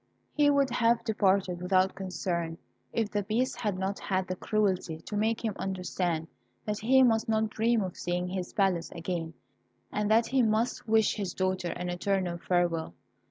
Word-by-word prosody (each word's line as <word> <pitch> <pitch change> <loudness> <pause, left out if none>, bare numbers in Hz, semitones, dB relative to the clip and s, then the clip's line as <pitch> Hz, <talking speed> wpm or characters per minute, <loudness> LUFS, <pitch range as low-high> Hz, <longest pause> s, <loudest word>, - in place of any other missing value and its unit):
He 295 -1 +4
would 280 -2 +3
have 235 -1 +2
departed 195 -5 +1
without 185 +1 +2
concern 175 -3 -3 0.3
if 225 -2 -1
the 205 - 0
Beast 225 +6 -1
had 205 -4 -1
not 190 +1 -2
had 190 -1 -1
the 185 - -2
cruelty 190 -5 0
to 210 - -6
make 220 +2 0
him 215 - 0
understand 180 -3 -2 0.4
that 210 -1 -2
he 260 +4 +5
must 225 -3 +3
not 220 -1 +1
dream 225 -1 +2
of 185 -2 -5
seeing 180 +1 -2
his 185 -1 -4
palace 185 -6 +1
again, 165 -1 -4 0.6
and 210 0 -1
that 225 +1 +5
he 265 0 +2
must 225 +2 0
wish 220 0 +3
his 195 -4 -3
daughter 185 -1 0
an 180 0 -4
eternal 175 -1 -1
farewell. 170 - 0
195 Hz, 170 wpm, -29 LUFS, 180-220 Hz, 0.6 s, he